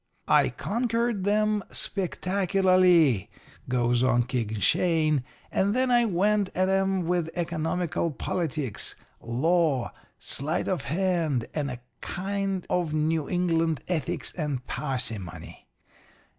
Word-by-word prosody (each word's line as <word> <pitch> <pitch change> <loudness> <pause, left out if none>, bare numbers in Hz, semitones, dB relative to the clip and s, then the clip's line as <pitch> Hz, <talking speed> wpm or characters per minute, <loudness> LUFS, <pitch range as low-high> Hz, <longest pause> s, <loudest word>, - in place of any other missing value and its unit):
"'I - - +4
conquered 230 -3 -1
'em, 210 0 +2
spectacularly,' 185 - +2 0.4
goes 120 -1 +2
on 125 -1 +3
King 115 -4 -2
Shane, 155 - +2 0.3
'and 200 +3 +1
then 255 0 +2
I 240 -1 +5
went 205 0 +2
at 185 +1 +2
'em 195 -1 +1
with 175 -1 0
economical 170 0 -1
politics, 150 - -3 0.3
law, 145 +2 +1 0.3
sleight 155 +5 -1
of 180 -7 -1
hand, 165 -5 0
and 145 -2 -1
a 125 -1 -7 0.2
kind 195 0 -2
of 170 -4 0
New 155 0 0
England 165 -4 +1
ethics 160 -7 -2
and 145 -7 -3
parsimony. 105 - -4
170 Hz, 110 wpm, -27 LUFS, 135-190 Hz, 0.4 s, I